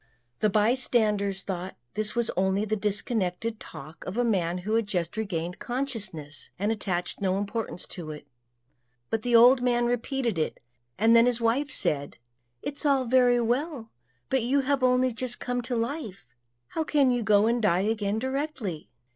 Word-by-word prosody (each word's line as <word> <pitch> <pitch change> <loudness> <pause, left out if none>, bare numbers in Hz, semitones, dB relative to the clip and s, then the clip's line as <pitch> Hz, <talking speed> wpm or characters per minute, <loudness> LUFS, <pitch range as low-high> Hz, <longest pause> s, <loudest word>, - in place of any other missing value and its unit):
The 215 - +3
bystanders 210 -3 +1
thought 185 -1 -5 0.2
this 215 +1 -2
was 235 -1 +1
only 190 +3 +1
the 215 0 0
disconnected 210 0 -1
talk 155 +4 -10
of 185 +4 -4
a 245 - +3
man 180 -7 +1
who 215 - -1
had 225 -2 +2
just 175 -5 -2
regained 180 -5 -3
consciousness, 210 - -5
and 205 +4 0
attached 185 -5 -2
no 190 -1 +1
importance 205 -2 -4
to 170 -4 -7
it; 150 -1 -8 0.9
but 225 - 0
the 240 +1 +1
old 245 +2 +7
man 240 -1 +2
repeated 240 - -1
it, 155 - -2 0.4
and 225 +3 +5
then 230 +1 +6
his 245 -1 +1
wife 240 +5 +1
said, 145 - 0 0.5
"It's 285 +2 -4
all 275 -3 +3
very 245 0 +4
well, 245 +1 -1 0.4
but 265 - +2
you 265 +5 +2
have 275 0 0
only 255 0 +3
just 245 +2 -4
come 245 0 -2
to 245 +1 -3
life; 230 - -3 0.4
how 320 - -1
can 285 -4 +3
you 245 -1 +1
go 210 -1 +4
and 235 +1 +1
die 185 -4 +3
again 210 0 0
directly?" 260 - -3
225 Hz, 170 wpm, -27 LUFS, 195-245 Hz, 0.9 s, old